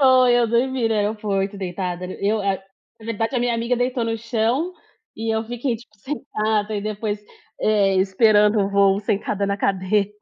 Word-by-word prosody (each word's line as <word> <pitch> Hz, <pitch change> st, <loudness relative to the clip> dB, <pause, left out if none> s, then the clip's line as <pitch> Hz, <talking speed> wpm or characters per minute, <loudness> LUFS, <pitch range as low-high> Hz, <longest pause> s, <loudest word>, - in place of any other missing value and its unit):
Foi, 255 Hz, -2 st, +6 dB
eu 240 Hz, -1 st, +4 dB
dormi 240 Hz, +1 st, +1 dB
no 225 Hz, -, +1 dB
aeroporto, 205 Hz, -1 st, -1 dB
deitada. 180 Hz, -1 st, -4 dB, 0.2 s
Eu, 205 Hz, +1 st, +1 dB
eh, 195 Hz, -1 st, -1 dB, 0.4 s
na 220 Hz, -, -11 dB
verdade, 225 Hz, +2 st, -2 dB
a 250 Hz, -, +2 dB
minha 240 Hz, 0 st, +1 dB
amiga 235 Hz, +2 st, 0 dB
deitou 245 Hz, 0 st, 0 dB
no 225 Hz, 0 st, -1 dB
chão, 240 Hz, +9 st, 0 dB, 0.4 s
e 225 Hz, 0 st, -1 dB
eu 220 Hz, -, 0 dB
fiquei, 245 Hz, +2 st, -2 dB
tipo, 215 Hz, -2 st, -19 dB
sentada 215 Hz, -4 st, -2 dB
e -, -, -2 dB
depois, 210 Hz, 0 st, -3 dB, 0.4 s
eh, 200 Hz, -3 st, +3 dB
esperando 210 Hz, +2 st, +4 dB
o 195 Hz, -, +1 dB
voo 200 Hz, 0 st, +4 dB
sentada 200 Hz, 0 st, -1 dB
na 200 Hz, 0 st, 0 dB
cadeira. 200 Hz, +1 st, +1 dB
215 Hz, 175 wpm, -22 LUFS, 200-235 Hz, 0.4 s, Foi